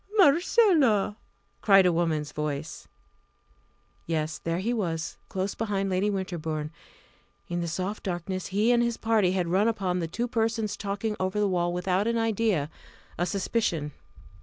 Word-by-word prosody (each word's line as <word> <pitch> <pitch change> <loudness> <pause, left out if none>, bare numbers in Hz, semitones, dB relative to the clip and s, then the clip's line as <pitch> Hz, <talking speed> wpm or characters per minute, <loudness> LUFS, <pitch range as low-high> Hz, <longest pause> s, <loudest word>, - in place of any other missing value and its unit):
"Marcella!" 310 - +4 0.5
cried 195 -2 +6
a 180 - +4
woman's 160 -3 0
voice. 150 0 -4 1.2
Yes 155 -1 -2
there 165 0 -2
he 220 +7 -1
was! 165 -7 -2
close 190 +1 -2
behind 195 -3 -2
Lady 190 +3 +1
Winterbourne. 160 -6 -3 0.8
In 175 0 -2
the 170 - -2
soft 185 +5 -3
darkness 185 0 -3
he 210 +5 +2
and 240 -1 +4
his 235 -1 0
party 215 -5 +2
had 180 -2 0
run 190 +5 +2
upon 190 -5 0
the 165 - -2
two 235 +9 -2
persons 225 -3 -1
talking 205 +2 -3
over 185 +2 -1
the 205 - +3
wall 175 -2 0
without 185 +3 0
an 230 0 +1
idea 220 -9 0 0.5
a 175 - +1
suspicion. 175 -5 -1
190 Hz, 150 wpm, -27 LUFS, 175-220 Hz, 1.2 s, cried